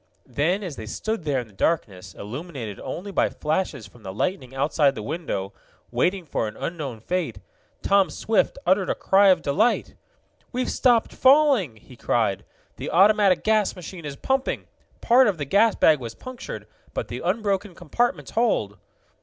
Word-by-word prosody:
Then, 180 Hz, +8 st, 0 dB
as 170 Hz, -7 st, -6 dB
they 110 Hz, -, -7 dB
stood 220 Hz, -, -3 dB
there 140 Hz, -4 st, +1 dB
in -, -, -9 dB
the 105 Hz, -, -20 dB
darkness, 95 Hz, -, -2 dB
illuminated 120 Hz, -, -7 dB
only 200 Hz, +4 st, -6 dB
by -, -, +2 dB
flashes 150 Hz, -, -2 dB
from 110 Hz, +3 st, -17 dB
the 95 Hz, -3 st, -7 dB
lightning 130 Hz, -, -3 dB
outside 140 Hz, 0 st, +2 dB
the 110 Hz, -, -6 dB
window, 110 Hz, -, -4 dB, 0.4 s
waiting 185 Hz, -1 st, 0 dB
for 125 Hz, -6 st, -2 dB
an 105 Hz, -, -8 dB
unknown 145 Hz, -9 st, -5 dB
fate, 180 Hz, +10 st, -2 dB, 0.5 s
Tom 195 Hz, -3 st, +4 dB
Swift 220 Hz, -, 0 dB
uttered 190 Hz, +1 st, +2 dB
a -, -, +1 dB
cry 195 Hz, +1 st, +4 dB
of 185 Hz, -4 st, +4 dB
delight. 210 Hz, +12 st, +1 dB, 0.6 s
"We've 255 Hz, 0 st, -1 dB
stopped 240 Hz, -3 st, +2 dB
falling!" 265 Hz, -, +4 dB
he 115 Hz, +4 st, -16 dB
cried. 110 Hz, -4 st, 0 dB, 0.3 s
"The -, -, -5 dB
automatic 200 Hz, +1 st, +4 dB
gas 215 Hz, -2 st, +2 dB
machine 180 Hz, -2 st, -9 dB
is 145 Hz, -2 st, -5 dB
pumping. 265 Hz, -, -1 dB, 0.4 s
Part 250 Hz, +2 st, +5 dB
of 200 Hz, -5 st, 0 dB
the 145 Hz, -, -3 dB
gas 205 Hz, +9 st, +3 dB
bag 155 Hz, -2 st, +4 dB
was 115 Hz, -3 st, -7 dB
punctured, 255 Hz, 0 st, -8 dB, 0.3 s
but -, -, -2 dB
the -, -, -6 dB
unbroken 205 Hz, -4 st, -1 dB
compartments 235 Hz, +8 st, -1 dB
hold!" 110 Hz, -, 0 dB
175 Hz, 165 wpm, -24 LUFS, 130-205 Hz, 0.6 s, Part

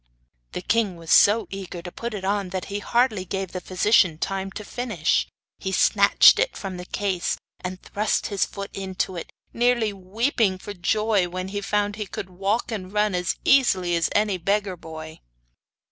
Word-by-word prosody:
The -, -, -4 dB
king 220 Hz, -4 st, +1 dB
was 165 Hz, -1 st, -7 dB
so 215 Hz, +3 st, +6 dB
eager 185 Hz, -3 st, -7 dB
to 175 Hz, -, -7 dB
put 235 Hz, +2 st, -5 dB
it 190 Hz, -2 st, -5 dB
on 200 Hz, -1 st, 0 dB
that 185 Hz, 0 st, -4 dB
he 205 Hz, -, -1 dB
hardly 225 Hz, -2 st, +1 dB
gave 190 Hz, 0 st, -4 dB
the 185 Hz, -, -5 dB
physician 185 Hz, -3 st, +3 dB
time 195 Hz, +3 st, -3 dB
to 210 Hz, -, -7 dB
finish. 220 Hz, -11 st, 0 dB, 0.3 s
He 190 Hz, -, -3 dB
snatched 200 Hz, +1 st, +6 dB
it -, -, 0 dB
from 190 Hz, -2 st, -5 dB
the 180 Hz, 0 st, -8 dB
case 195 Hz, -4 st, -1 dB, 0.2 s
and 185 Hz, 0 st, -5 dB
thrust 210 Hz, +3 st, -1 dB
his 200 Hz, -2 st, 0 dB
foot 200 Hz, 0 st, -6 dB
into 190 Hz, -1 st, -3 dB
it, 170 Hz, -, -7 dB, 0.2 s
nearly 235 Hz, -3 st, +2 dB
weeping 200 Hz, +2 st, 0 dB
for 205 Hz, +2 st, -8 dB
joy 205 Hz, +1 st, +1 dB
when 185 Hz, +1 st, -4 dB
he 205 Hz, +1 st, -3 dB
found 205 Hz, 0 st, -1 dB
he 210 Hz, -2 st, -4 dB
could 185 Hz, +1 st, -6 dB
walk 200 Hz, +6 st, -1 dB
and 190 Hz, -4 st, -5 dB
run 210 Hz, -1 st, +1 dB
as 180 Hz, -1 st, 0 dB
easily 190 Hz, -10 st, +4 dB
as 165 Hz, -1 st, +1 dB
any 205 Hz, -3 st, +2 dB
beggar 200 Hz, +1 st, 0 dB
boy. 160 Hz, -1 st, -9 dB
195 Hz, 180 wpm, -24 LUFS, 185-210 Hz, 0.3 s, so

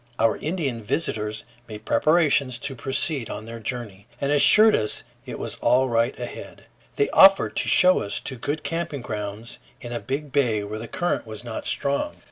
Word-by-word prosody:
Our 115 Hz, -1 st, +2 dB
Indian 150 Hz, -8 st, -3 dB
visitors 110 Hz, -3 st, -2 dB, 0.2 s
made 105 Hz, -1 st, -10 dB
preparations 150 Hz, -6 st, +2 dB
to 135 Hz, +3 st, -5 dB
proceed 135 Hz, -, -1 dB
on 110 Hz, -, -7 dB
their 115 Hz, 0 st, -8 dB
journey, 110 Hz, -4 st, -6 dB
and 140 Hz, 0 st, -1 dB
assured 215 Hz, +9 st, +6 dB
us 105 Hz, -, -1 dB, 0.2 s
it -, -, -6 dB
was -, -, -5 dB
all 130 Hz, +2 st, +2 dB
right 115 Hz, +2 st, 0 dB
ahead. 120 Hz, -, -9 dB, 0.3 s
They 140 Hz, -, +1 dB
offered 195 Hz, 0 st, +6 dB
to -, -, +3 dB
show 185 Hz, 0 st, +6 dB
us 100 Hz, -, -3 dB
to 130 Hz, -, -3 dB
good 145 Hz, +6 st, -4 dB
camping 165 Hz, -5 st, -3 dB
grounds 105 Hz, +1 st, -6 dB, 0.2 s
in 120 Hz, -, -9 dB
a 120 Hz, -, -3 dB
big 140 Hz, +2 st, -5 dB
bay 120 Hz, -7 st, +1 dB
where 105 Hz, +1 st, -6 dB
the 115 Hz, -, -7 dB
current 175 Hz, -6 st, -2 dB
was 110 Hz, +1 st, -8 dB
not 120 Hz, -2 st, -6 dB
strong. 140 Hz, -, -1 dB
125 Hz, 180 wpm, -23 LUFS, 110-145 Hz, 0.3 s, assured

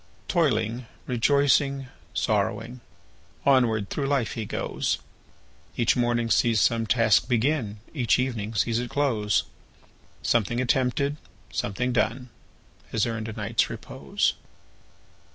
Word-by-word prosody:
Toiling,—rejoicing,—sorrowing, 125 Hz, -, 0 dB, 0.6 s
Onward 115 Hz, -7 st, +3 dB
through 140 Hz, -2 st, -1 dB
life 135 Hz, -6 st, +1 dB
he 110 Hz, -, -4 dB
goes; -, -, -2 dB, 0.8 s
Each 115 Hz, -, +3 dB
morning 120 Hz, -1 st, +1 dB
sees 115 Hz, -3 st, +3 dB
some 115 Hz, -1 st, +2 dB
task 115 Hz, +1 st, +3 dB
begin, 120 Hz, -3 st, +1 dB, 0.2 s
Each 125 Hz, -7 st, +2 dB
evening 115 Hz, -4 st, -2 dB
sees 115 Hz, +2 st, +1 dB
it 120 Hz, 0 st, -4 dB
close; 115 Hz, -8 st, +1 dB, 0.8 s
Something 120 Hz, +1 st, +1 dB
attempted, 130 Hz, +3 st, +1 dB, 0.4 s
something 120 Hz, +5 st, -1 dB
done. 120 Hz, +2 st, 0 dB, 0.6 s
Has 110 Hz, -, +1 dB
earned 115 Hz, -2 st, -3 dB
a 110 Hz, -, -5 dB
night's 110 Hz, +1 st, 0 dB
repose. -, -, -1 dB
120 Hz, 100 wpm, -26 LUFS, 110-130 Hz, 0.8 s, Onward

